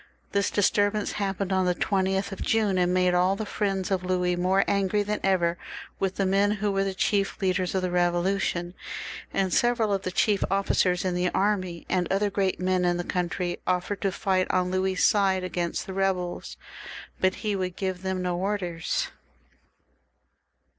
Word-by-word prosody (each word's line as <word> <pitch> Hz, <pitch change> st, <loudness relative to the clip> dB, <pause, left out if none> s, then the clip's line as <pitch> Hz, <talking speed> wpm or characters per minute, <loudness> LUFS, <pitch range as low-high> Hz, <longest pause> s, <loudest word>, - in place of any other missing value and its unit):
This 200 Hz, 0 st, +1 dB
disturbance 205 Hz, +1 st, +1 dB
happened 195 Hz, -1 st, -2 dB
on 185 Hz, -1 st, +2 dB
the 180 Hz, -, +2 dB
20th 190 Hz, +1 st, 0 dB
of 195 Hz, -, -7 dB
June, 210 Hz, -4 st, +1 dB
and 180 Hz, 0 st, +2 dB
made 180 Hz, 0 st, +3 dB
all 180 Hz, +2 st, +3 dB
the 215 Hz, -, -4 dB
friends 195 Hz, -2 st, -2 dB
of 185 Hz, -1 st, 0 dB
Louis 180 Hz, -1 st, +1 dB
more 185 Hz, +2 st, +2 dB
angry 200 Hz, +1 st, +1 dB
than 210 Hz, +1 st, -2 dB
ever 175 Hz, -3 st, +1 dB, 0.4 s
with 190 Hz, -1 st, -1 dB
the 195 Hz, -, 0 dB
men 200 Hz, +2 st, +3 dB
'who 210 Hz, 0 st, -1 dB
were 195 Hz, 0 st, +1 dB
the 195 Hz, -1 st, -2 dB
chief 195 Hz, 0 st, 0 dB
leaders 185 Hz, -1 st, 0 dB
of 190 Hz, -, 0 dB
the -, -, +1 dB
Eevolution, 175 Hz, 0 st, 0 dB, 0.6 s
and 190 Hz, -2 st, 0 dB
several 235 Hz, -3 st, +2 dB
of 195 Hz, -, 0 dB
the 185 Hz, -, -3 dB
chief 200 Hz, +2 st, +2 dB
officers 190 Hz, -2 st, +1 dB
in 185 Hz, -, 0 dB
the 180 Hz, 0 st, +1 dB
army, 185 Hz, -4 st, 0 dB
and 180 Hz, -2 st, 0 dB
other 200 Hz, +1 st, +1 dB
great 195 Hz, -1 st, 0 dB
men 185 Hz, 0 st, +1 dB
in 175 Hz, 0 st, +2 dB
the 175 Hz, -, -2 dB
country, 175 Hz, 0 st, -2 dB
offered 185 Hz, +2 st, -1 dB
to 195 Hz, -, +1 dB
fight 185 Hz, 0 st, 0 dB
on 180 Hz, 0 st, +1 dB
Louis's 185 Hz, 0 st, +1 dB
side 195 Hz, -3 st, +3 dB
against 175 Hz, -1 st, -2 dB
the 190 Hz, -, -6 dB
rebels, 185 Hz, -2 st, -2 dB, 0.6 s
but 185 Hz, 0 st, +2 dB
he 210 Hz, -1 st, +1 dB
would 185 Hz, -2 st, -3 dB
give 185 Hz, -2 st, -3 dB
them 190 Hz, -1 st, -2 dB
no 180 Hz, -1 st, -1 dB
orders. 190 Hz, -, -2 dB
190 Hz, 180 wpm, -26 LUFS, 180-200 Hz, 0.6 s, made